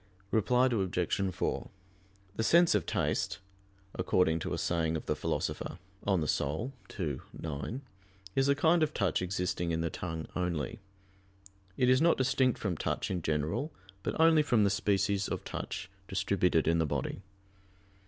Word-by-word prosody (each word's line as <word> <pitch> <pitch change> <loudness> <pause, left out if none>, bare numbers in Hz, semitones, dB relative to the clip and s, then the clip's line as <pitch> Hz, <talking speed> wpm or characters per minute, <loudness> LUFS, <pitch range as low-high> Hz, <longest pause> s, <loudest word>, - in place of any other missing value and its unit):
Reply 125 +3 +3
Obj. 95 -4 0
4: - - -2 0.7
The 110 - 0
sense 170 +7 +5
of - - +1
taste, 100 +1 0 0.6
according 90 -2 +2
to 90 +2 -4
a 85 - -1
saying 80 -1 0
of - - -8
the - - 0
Philosopher 80 - -2 0.3
(De - - -3
Anima 80 - 0 0.3
ii, 75 -7 -1 0.2
9), 80 - -4 0.5
is 135 +1 +3
a 140 - +5
kind 160 +4 +4
of 155 -1 +1
touch 95 -3 +1
existing 90 -2 -1
in 80 0 0
the 85 -1 -1
tongue 80 -2 -4
only. 90 +4 -2 1.0
It 125 - +3
is 130 +2 +5
not 170 +1 +4
distinct 130 -1 +2
from 95 -6 -2
touch - - -2
in 90 -2 -1
general, 80 - -1 0.3
but 100 - -3
only 160 -1 +6
from 120 -7 +3
the 100 - +3
species 100 -1 +1
of - - -3
touch - - -5 0.2
distributed 90 -4 +1
in 85 0 +3
the 80 - +2
body. - - -2
95 Hz, 155 wpm, -31 LUFS, 85-125 Hz, 1.0 s, only